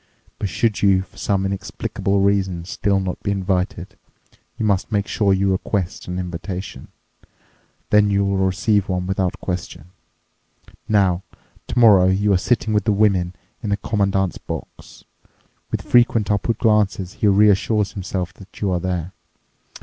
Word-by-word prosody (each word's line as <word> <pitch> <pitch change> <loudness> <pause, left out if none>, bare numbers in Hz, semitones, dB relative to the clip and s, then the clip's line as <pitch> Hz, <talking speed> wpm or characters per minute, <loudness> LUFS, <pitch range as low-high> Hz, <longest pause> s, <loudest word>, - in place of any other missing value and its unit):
But 100 - -2
should 110 +4 0
you 95 -2 +4
for - - -22
some 95 -1 0
inexplicable 100 0 -2
reason 95 -4 +1
still 100 0 0
not 95 -1 -4
be - - -3
invited, 95 -1 -2 0.6
you 110 - -1
must 100 +1 0
make 100 -2 +1
sure 100 -2 +1
you 95 0 +2
request 95 -1 -2
an 90 0 -4
invitation. 90 -4 -6 1.0
Then 105 -1 +5
you'll 100 -1 +1
receive 95 +2 +1
one 90 -1 -1
without 95 -1 -1
question. 90 -2 -5 1.0
Now, 95 -4 +3 0.5
tomorrow 105 -7 +5
you 100 +2 +2
are 90 - +3
sitting 110 +1 0
with 105 -1 +1
the 110 - +3
women 100 -4 +2 0.3
in 105 - -4
the 100 - +1
commandant's 95 -3 0
box. - - -9 0.7
With - - -3
frequent 115 -3 +3
upward 105 +2 0
glances 105 -5 +1
he 105 - +4
reassures 105 +1 +3
himself 90 -2 -4
that 95 0 -15
you 100 -2 0
are 90 - 0
there. 90 -1 -3
95 Hz, 145 wpm, -21 LUFS, 95-105 Hz, 1.0 s, Then